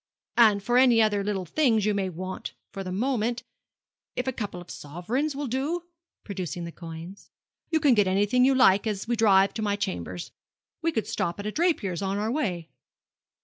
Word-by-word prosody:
And 210 -4 +6
for 245 +3 +3
any 245 -3 +6
other 210 -2 +3
little 195 -2 -2
things 225 - +2
you 210 - +2
may 195 -2 -1
want 185 +2 -6 0.2
for 195 - -5
the 185 - -5
moment, 240 +3 -1 0.7
if 250 - -2
a 260 - 0
couple 205 -6 -5
of 175 - -10
sovereigns 220 - -3
will 285 +1 -3
do' 280 +8 -2 0.4
producing 180 -3 -5
those 170 0 -7
coins 170 +3 -9 0.4
'you 320 -1 +2
can 285 -4 +5
get 205 -4 +3
anything 205 +6 +3
you 265 +1 +4
like 205 -5 +5
as 210 0 -3
we 240 - +1
drive 200 -3 +4
to 220 - -4
my 205 -1 +1
chambers. 90 - -4 0.5
We 330 0 +1
could 225 -7 -1
stop 170 +3 -2
at 205 - -5
a 210 - -1
draper's 220 - 0
on 195 0 -1
our 215 +2 -1
way.' 185 - -2
205 Hz, 190 wpm, -26 LUFS, 185-250 Hz, 0.7 s, And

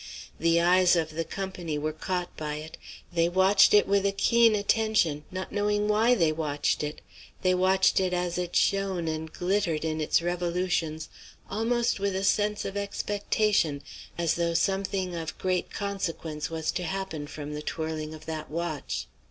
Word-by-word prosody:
The 165 0 +3
eyes 180 +1 +5
of 160 -2 0
the 165 +1 -2
company 180 -4 -4
were 155 +1 -2
caught 180 +2 -3
by 150 -1 -4
it; 155 +1 -8 0.4
they 170 0 +2
watched 190 +3 +5
it 205 - +5
with 200 0 +2
a 200 - +2
keen 230 +3 +4
attention, 205 -8 +1
not 185 0 -5
knowing 205 0 +1
why 220 +4 +4
they 165 -8 +3
watched 150 -2 -1
it; 150 0 -4 0.4
they 185 0 +4
watched 190 +1 +3
it 185 -1 0
as 180 0 -1
it 175 -1 -4
shone 195 -4 +1
and 160 0 -3
glittered 180 -4 0
in 155 0 -1
its 155 - +3
revolutions, 175 -2 -1 0.4
almost 230 +2 0
with 200 -1 -1
a 190 - -1
sense 210 +1 +1
of 195 - -4
expectation, 200 -6 0 0.3
as 170 -2 +1
though 170 -1 0
something 190 -1 0
of 165 -2 -5
great 185 -1 -1
consequence 165 -6 -4
was 160 -1 -2
to 180 - -3
happen 175 -4 -4
from 150 0 -7
the 150 - -4
twirling 155 0 -4
of 155 - -13
that 155 -1 -5
watch. 165 -2 -3
180 Hz, 170 wpm, -27 LUFS, 160-195 Hz, 0.4 s, eyes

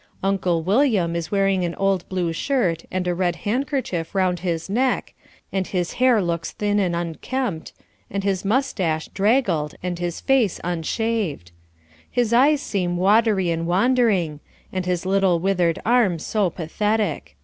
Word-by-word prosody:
Uncle 185 -4 +1
William 200 - +2
is 170 -1 -3
wearing 195 -2 +1
an 170 -1 -2
old 195 -2 0
blue 180 -3 -1
shirt 175 - 0
and 185 -1 -2
a 180 - +1
red 175 -1 0
handkerchief 230 - -2
round 185 -2 +1
his 165 -2 -2
neck, 245 +6 0 0.4
and 190 -1 -1
his 180 -2 -2
hair 245 -5 +5
looks 170 -1 -2
thin 205 0 0
and 180 -4 +1
unkempt, 170 +3 -3 0.4
and 200 0 -3
his 195 -2 0
moustache 195 - 0
draggled 195 - +1
and 180 -1 -3
his 175 -1 -3
face 255 -8 +2
unshaved. 175 - -2 0.6
His 240 -2 0
eyes 285 +4 +4
seem 180 -4 -1
watery 200 -1 +3
and 165 0 -2
wandering, 190 - +2 0.3
and 185 -1 -2
his 180 0 -1
little 190 -2 +2
withered 180 -2 +1
arm 225 -7 +3
so 200 +4 0
pathetic. 210 +6 -2
190 Hz, 150 wpm, -22 LUFS, 170-220 Hz, 0.6 s, hair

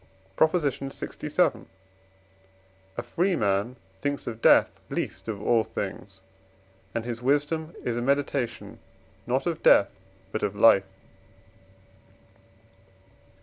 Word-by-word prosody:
PROP. 160 +7 +4
LXVII. 140 -4 -1 1.3
A 120 - -2
free 175 +10 0
man 100 +1 0 0.3
thinks 145 0 -2
of 115 -1 -6
death - - +4
least - - -4
of 110 -3 -4
all 115 +2 +2
things; 95 -3 -6 0.7
and 115 -1 -2
his 120 -1 -4
wisdom 150 +5 0
is 120 -1 -2
a - - -1
meditation 125 -5 -1 0.5
not 130 +2 0
of 170 -2 -2
death 100 - +5 0.4
but 110 - -3
of 105 - -1
life. 100 -2 +5
120 Hz, 105 wpm, -26 LUFS, 110-145 Hz, 1.3 s, death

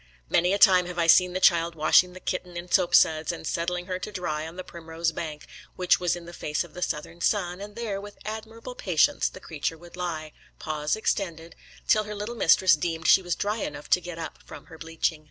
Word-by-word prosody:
Many 175 +2 +3
a 200 - +2
time 185 -3 +6
have 180 0 -7
I 170 - +2
seen 180 +2 +5
the 185 - -1
child 170 -2 +3
washing 170 +3 +4
the 185 - -10
kitten 180 -1 -4
in 175 +1 -8
soap 185 -3 +3
suds, 155 +1 +4
and 170 - -8
setting 175 +2 -2
her 185 0 -4
to 200 - -6
dry 160 -5 -3
on 165 - -10
the 185 - -6
primrose 165 -1 -4
bank, 155 -2 -6 0.3
which 180 -1 +3
was 175 -1 0
in 175 -1 -9
the 170 - -10
face 150 -1 -2
of 170 -3 -15
the 180 - -8
southern 170 0 -4
sun, 180 -2 0
and 205 0 -9
there 215 -4 -4
with 205 0 -11
admirable 225 +3 -7
patience 205 - +2
the - - -12
creature 160 -2 -4
would 175 +1 -14
lie, 160 -4 -4 0.3
paws 150 -1 -2
extended, 170 -6 -3 0.3
till 215 -1 +3
her 210 0 -6
little 210 +3 -5
mistress 185 -5 +5
deemed 160 +1 -3
she - - +7
was 175 -2 -2
dry 210 +2 -1
enough 150 -8 -6
to 180 - +4
get 175 -1 -7
up 165 -1 -7
from - - -12
her 160 - -12
bleaching. 165 -1 -2
175 Hz, 225 wpm, -26 LUFS, 165-190 Hz, 0.3 s, she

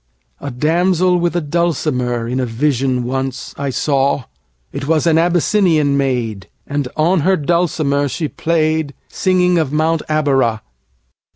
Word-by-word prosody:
A 140 - -5
damsel 175 +7 +2
with 175 0 -1
a 175 - +1
dulcimerIn 130 -7 -1
a 130 - 0
vision 130 +1 0
once 130 +1 -4
I 140 0 -3
saw:It 135 - -3
was 160 -1 +2
an 165 -1 +4
Abyssinian 170 -3 +2
maid, 120 -8 -2 0.2
And 140 -2 -2
on 170 +4 +3
her 185 +5 +2
dulcimer 150 -3 0
she 155 +3 -3
played, 155 -2 -1
Singing 180 -2 +2
of 155 -4 -1
Mount 160 +1 +1
Abora. 135 -7 +1
145 Hz, 125 wpm, -17 LUFS, 130-170 Hz, 0.2 s, an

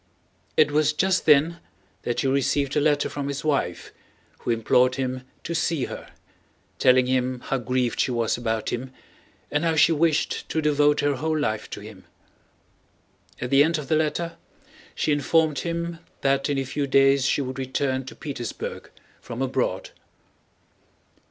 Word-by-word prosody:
It 150 -2 +5
was 150 0 +2
just 190 +3 +1
then 155 +3 +5 0.4
that 120 - -1
he - - 0
received 140 +1 +1
a 150 - +3
letter 145 -1 +2
from 140 -1 -4
his 140 0 -4
wife, 140 - -1 0.5
who - - -6
implored 125 +2 +3
him 130 -1 -2 0.2
to 170 - -4
see 165 -4 0
her, - - -8 0.7
telling 130 0 +5
him 130 -1 0
how 135 - -2
grieved 125 0 -1
she - - +2
was 115 -2 0
about 115 -2 -2
him 125 +2 -4 0.6
and 150 +2 0
how 165 -1 +1
she 160 +2 +5
wished 160 -1 +1
to 160 - 0
devote 150 -1 +3
her 145 -2 +1
whole 155 +3 -1
life 110 -8 -2
to - - -7
him. - - -12 1.3
At 125 - -4
the 140 +1 +7
end 165 +2 +1
of 150 -3 -7
the 155 - +3
letter 160 +2 -1 0.6
she - - 0
informed 150 +1 +2
him 170 0 -3 0.2
that 135 +1 +1
in 145 - 0
a 135 - -1
few 140 +2 -2
days 135 0 +4
she 140 - +1
would 130 +1 -5
return 130 0 -1
to - - -9
Petersburg 130 -6 -6 0.3
from 115 - -7
abroad. 130 -1 -1
140 Hz, 165 wpm, -24 LUFS, 130-155 Hz, 1.3 s, the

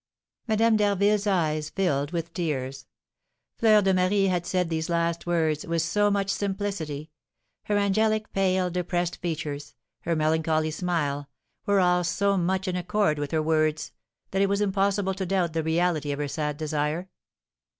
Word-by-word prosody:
Madame 220 0 +3
d'Harville's 205 0 +2
eyes 155 -5 0
filled 145 -7 0
with 170 0 -4
tears. 135 -6 -3 0.7
Fleur 215 -2 +5
de 190 0 +3
Marie 185 +2 +2
had 175 -2 -1
said 180 -2 0
these 160 0 -2
last 170 0 -1
words 160 -3 +1
with 165 -1 -1
so 205 +5 +2
much 200 -1 0
simplicity; 190 -7 -3 0.5
her 205 - +1
angelic, 215 +2 +1
pale, 185 -2 +1
depressed 175 0 -1
features, 150 -4 -4 0.2
her 170 +7 -1
melancholy 155 0 +1
smile, 150 -5 -2 0.4
were 200 -1 +4
all 180 -1 +3
so 200 +4 +1
much 190 +1 0
in 185 - -1
accord 180 -3 0
with 145 -1 -3
her 155 +1 0
words, 155 -1 +1 0.4
that 195 - +1
it 200 - +3
was 200 0 +1
impossible 200 -1 +1
to 190 0 -4
doubt 180 -3 0
the 165 - 0
reality 160 -2 0
of 140 - -3
her 145 0 -2
sad 150 0 -3
desire. 155 +3 -2
175 Hz, 160 wpm, -26 LUFS, 155-195 Hz, 0.7 s, Fleur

